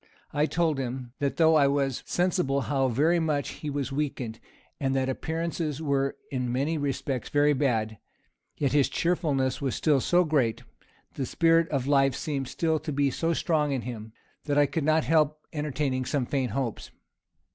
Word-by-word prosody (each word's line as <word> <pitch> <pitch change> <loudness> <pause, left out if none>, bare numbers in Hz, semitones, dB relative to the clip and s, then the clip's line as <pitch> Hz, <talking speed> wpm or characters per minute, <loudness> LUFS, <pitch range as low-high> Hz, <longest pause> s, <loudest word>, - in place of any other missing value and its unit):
I 150 +1 +2
told 160 -4 0
him, 125 -1 -5
that 140 -1 -1
though 160 -1 +5
I 145 -3 +5
was 140 -2 0
sensible 175 -6 +1
how 135 -1 +1
very 155 +8 +2
much 150 -4 0
he 150 - -6
was 140 -2 -3
weakened, 135 -5 -3 0.4
and 135 -1 0
that 135 0 +1
appearances 160 +1 -3
were 140 -3 0
in 125 -2 -2
many 140 +6 0
respects 135 -2 -2
very 145 0 +3
bad, 110 -6 0 0.6
yet 140 -3 0
his 145 -2 +3
cheerfulness 150 -7 0
was 135 -3 -1
still 145 -4 +2
so 180 +6 +3
great, 135 -9 0 0.5
the 135 - -3
spirit 165 0 +3
of 135 -4 -1
life 135 -1 +3
seemed 140 -4 -3
still 160 +2 0
to 155 +1 -5
be 140 -1 +1
so 165 - -2
very 165 - +2
strong 150 -5 +1
in 130 -4 -2
him, 110 -3 -7 0.3
that 145 -1 0
I 145 - +6
could 150 +1 -2
not 155 0 +3
help 155 -1 +1
entertaining 145 -3 -1
some 130 0 0
faint 130 -4 -1
hopes. 125 -3 -3
140 Hz, 180 wpm, -27 LUFS, 130-155 Hz, 0.6 s, I